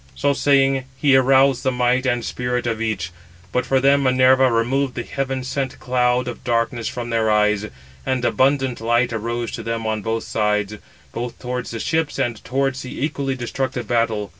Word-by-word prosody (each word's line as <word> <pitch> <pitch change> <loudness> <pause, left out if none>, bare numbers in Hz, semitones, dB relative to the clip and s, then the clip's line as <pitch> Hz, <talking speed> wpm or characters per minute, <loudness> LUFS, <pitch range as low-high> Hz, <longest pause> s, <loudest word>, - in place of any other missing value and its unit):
So 140 - +1
saying, 135 -2 +2
he 140 -2 +4
aroused 135 0 +4
the 130 - +1
might 125 +1 +1
and 120 -2 0
spirit 125 0 -2
of 115 -2 -2
each. 100 -7 -2 0.4
But 125 0 -1
for 135 +1 +3
them 140 +1 +4
Minerva 130 0 +4
removed 125 +4 0
the 120 - -3
heaven 135 -1 -3
sent 130 0 -3
cloud 125 0 +1
of 120 - -6
darkness 115 -1 0
from 120 -1 -5
their 110 -1 +1
eyes; 105 0 +2 0.4
and 130 -2 -1
abundant 130 -2 +1
light 120 +1 +1
arose 115 +1 -3
to - - -5
them 115 0 -3
on 110 -1 -1
both 115 +1 -2
sides, 105 -1 -1 0.3
both 120 0 -5
towards 125 0 -4
the 115 - -5
ships 160 +3 -1
and 120 -5 -2
towards 135 0 -1
the 130 - -7
equally 140 -3 -2
destructive 130 0 -3
battle. 110 -3 0
125 Hz, 180 wpm, -21 LUFS, 115-130 Hz, 0.4 s, he